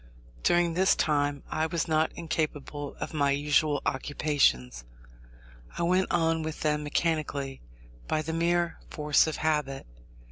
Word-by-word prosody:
During 175 Hz, -, +3 dB
this 190 Hz, +3 st, +3 dB
time 145 Hz, -2 st, 0 dB
I 155 Hz, +1 st, 0 dB
was 165 Hz, 0 st, -2 dB
not 155 Hz, 0 st, +2 dB
incapable 150 Hz, -3 st, -3 dB
of -, -, -5 dB
my 145 Hz, -2 st, +2 dB
usual 145 Hz, +1 st, +2 dB
occupations. 130 Hz, -, +1 dB, 0.9 s
I -, -, -1 dB
went 185 Hz, +2 st, +2 dB
on 165 Hz, -1 st, +1 dB
with 160 Hz, 0 st, -5 dB
them 150 Hz, -1 st, +1 dB
mechanically, 145 Hz, -3 st, -1 dB, 0.5 s
by 155 Hz, -, 0 dB
the 160 Hz, +1 st, -4 dB
mere 170 Hz, +1 st, +1 dB
force 150 Hz, 0 st, +3 dB
of 160 Hz, -, -2 dB
habit. 150 Hz, -4 st, -1 dB
155 Hz, 135 wpm, -28 LUFS, 145-165 Hz, 0.9 s, During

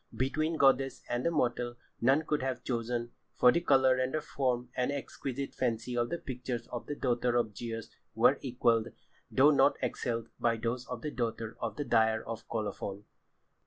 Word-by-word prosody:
Between 155 Hz, +5 st, 0 dB
goddess 135 Hz, -2 st, +3 dB
and 120 Hz, +7 st, +1 dB
mortal 120 Hz, -4 st, 0 dB, 0.3 s
none 135 Hz, +6 st, +4 dB
could 150 Hz, -3 st, 0 dB
have 130 Hz, -2 st, -2 dB
chosen, 120 Hz, -1 st, -2 dB, 0.2 s
for 125 Hz, -, +6 dB
the 170 Hz, -, +1 dB
colour 130 Hz, -5 st, +4 dB
and 130 Hz, +2 st, 0 dB
form 125 Hz, -3 st, -1 dB
and 125 Hz, +2 st, +1 dB
exquisite 140 Hz, -1 st, -4 dB
fancy 120 Hz, 0 st, -1 dB
of 120 Hz, 0 st, +1 dB
the 170 Hz, -, -2 dB
pictures 125 Hz, -4 st, -5 dB
of 120 Hz, -, -6 dB
the 145 Hz, -, -3 dB
daughter 120 Hz, -2 st, +1 dB
of 110 Hz, -4 st, +1 dB
Zeus 115 Hz, 0 st, -5 dB, 0.2 s
were -, -, +5 dB
equalled, 120 Hz, -3 st, +2 dB, 0.4 s
though 140 Hz, +3 st, +6 dB
not 140 Hz, 0 st, +5 dB
excelled, 115 Hz, -2 st, -2 dB
by 115 Hz, -1 st, +2 dB
those 120 Hz, +2 st, -3 dB
of 125 Hz, -2 st, -6 dB
the 150 Hz, -, -2 dB
daughter 115 Hz, -3 st, -3 dB
of -, -, -3 dB
the 145 Hz, -, -3 dB
dyer 110 Hz, -2 st, +3 dB
of 115 Hz, -, -7 dB
Colophon. 105 Hz, -2 st, -4 dB
125 Hz, 170 wpm, -31 LUFS, 115-135 Hz, 0.4 s, for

